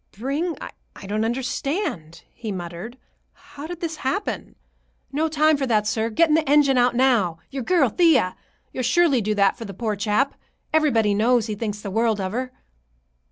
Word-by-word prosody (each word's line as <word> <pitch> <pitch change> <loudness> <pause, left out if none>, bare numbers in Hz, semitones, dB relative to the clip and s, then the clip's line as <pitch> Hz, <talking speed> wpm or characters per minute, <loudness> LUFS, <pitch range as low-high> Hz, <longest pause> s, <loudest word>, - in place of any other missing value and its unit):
"Bring—I 280 - -5
don't 210 +2 -1
understand," 240 - -3
he 225 -3 -6
muttered. 175 +6 -7 0.4
"How 290 +2 -11
did 350 0 -7
this 325 -2 -3
happen?" 385 +11 -3 0.6
"No 305 +3 0
time 310 0 +3
for 270 -1 -2
that, 215 -3 +2
sir. 220 +1 0
Getting 315 +7 +3
the 310 -2 +2
engine 285 -2 +5
out 245 0 +3
now. 235 -10 +2
Your 275 -1 -4
girl, 315 +1 +3
Thea. 270 - +3 0.4
You'll - - -3
surely 270 +1 +3
do 210 +1 -1
that 200 -1 +2
for 230 - -6
the 195 -3 -8
poor 215 +1 -2
chap. 210 +7 +1 0.4
Everybody 235 -10 +3
knows 230 +2 +2
he 215 - -3
thinks 210 -1 -4
the 200 - -6
world 225 0 +1
of 190 -1 -2
her." 255 +3 -3
245 Hz, 170 wpm, -23 LUFS, 210-290 Hz, 0.6 s, engine